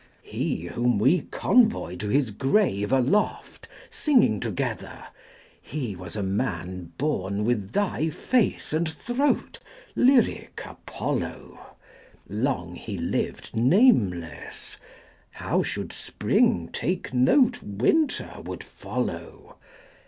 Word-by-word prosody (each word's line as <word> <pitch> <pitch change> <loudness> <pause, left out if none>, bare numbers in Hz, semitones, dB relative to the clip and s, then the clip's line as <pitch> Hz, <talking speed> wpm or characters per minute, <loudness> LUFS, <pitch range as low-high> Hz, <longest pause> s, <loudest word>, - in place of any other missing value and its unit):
30 - - -17
He, - - -1
whom 120 +5 +1
we 135 - +4
convoy 225 - +2
to 105 +3 -4
his 135 -2 +2
grave 130 - +1
aloft, 135 +10 0 0.2
Singing 245 - +3
together, - - -4 0.6
He 125 -9 -4
was 90 0 -8
a 105 - -2
man 95 -4 -3
born 105 -8 -1
with 110 -4 0
thy 175 -2 0
face 205 - 0
and 160 +1 +1
throat, 245 - -1 0.4
Lyric 250 -2 +3
Apollo! - - -5 0.5
Long 105 -5 -2
he - - -6
lived - - -3
nameless; 115 - +2 0.6
how - - 0
should - - -4
Spring 85 -1 +1
take 175 -4 -2
note 225 - +4
35 100 -1 -9
Winter 315 - +2
would - - -6
follow? 425 +4 -6
130 Hz, 110 wpm, -26 LUFS, -, 0.6 s, we